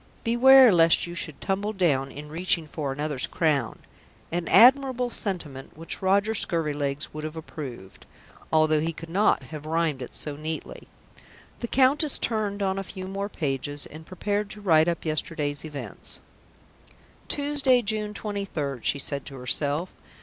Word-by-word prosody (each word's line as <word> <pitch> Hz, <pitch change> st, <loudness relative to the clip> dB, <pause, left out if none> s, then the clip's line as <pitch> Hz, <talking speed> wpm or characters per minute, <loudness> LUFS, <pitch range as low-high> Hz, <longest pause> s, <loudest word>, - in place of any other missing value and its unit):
_ -, -, -30 dB
Beware 255 Hz, 0 st, +7 dB
lest 165 Hz, -1 st, +5 dB
you 175 Hz, -, -7 dB
should 160 Hz, -3 st, -5 dB
tumble 200 Hz, +2 st, -2 dB
down 140 Hz, -9 st, +1 dB
In 145 Hz, +2 st, -9 dB
reaching 165 Hz, +1 st, 0 dB
for 145 Hz, -2 st, -4 dB
another's 145 Hz, -1 st, -1 dB
crown." 145 Hz, -8 st, 0 dB, 0.5 s
An 170 Hz, 0 st, -2 dB
admirable 250 Hz, 0 st, +5 dB
sentiment 155 Hz, -13 st, -5 dB
which 165 Hz, +1 st, -5 dB
Roger 200 Hz, +3 st, +2 dB
Scurvilegs 145 Hz, -7 st, -1 dB
would 155 Hz, 0 st, -6 dB
have 155 Hz, +1 st, -5 dB
approved, 130 Hz, -11 st, -9 dB, 0.4 s
although 155 Hz, -1 st, +4 dB
he 165 Hz, +2 st, -1 dB
could 165 Hz, +1 st, -10 dB
not 205 Hz, +4 st, +2 dB
have 155 Hz, -1 st, -7 dB
rhymed 160 Hz, -4 st, 0 dB
it 125 Hz, -, -8 dB
so 150 Hz, -2 st, -3 dB
neatly. 155 Hz, +2 st, -6 dB, 0.7 s
The 235 Hz, -, -3 dB
Countess 275 Hz, +4 st, +3 dB
turned 210 Hz, -3 st, -1 dB
on 190 Hz, 0 st, 0 dB
a -, -, -3 dB
few 185 Hz, 0 st, -8 dB
more 195 Hz, +2 st, -4 dB
pages 145 Hz, -3 st, -2 dB
and 155 Hz, +1 st, -11 dB
prepared 205 Hz, +4 st, -2 dB
to 210 Hz, 0 st, -9 dB
write 160 Hz, -5 st, +4 dB
up 170 Hz, -1 st, -2 dB
yesterday's 150 Hz, -2 st, -2 dB
events. 150 Hz, -3 st, -7 dB, 1.1 s
"Tuesday, 285 Hz, -4 st, +2 dB
June 210 Hz, 0 st, -1 dB
23rd," 190 Hz, -, -4 dB
she -, -, +1 dB
said 140 Hz, 0 st, -3 dB
to 135 Hz, -, -8 dB
herself. 145 Hz, +6 st, -1 dB
165 Hz, 155 wpm, -26 LUFS, 150-205 Hz, 1.1 s, Beware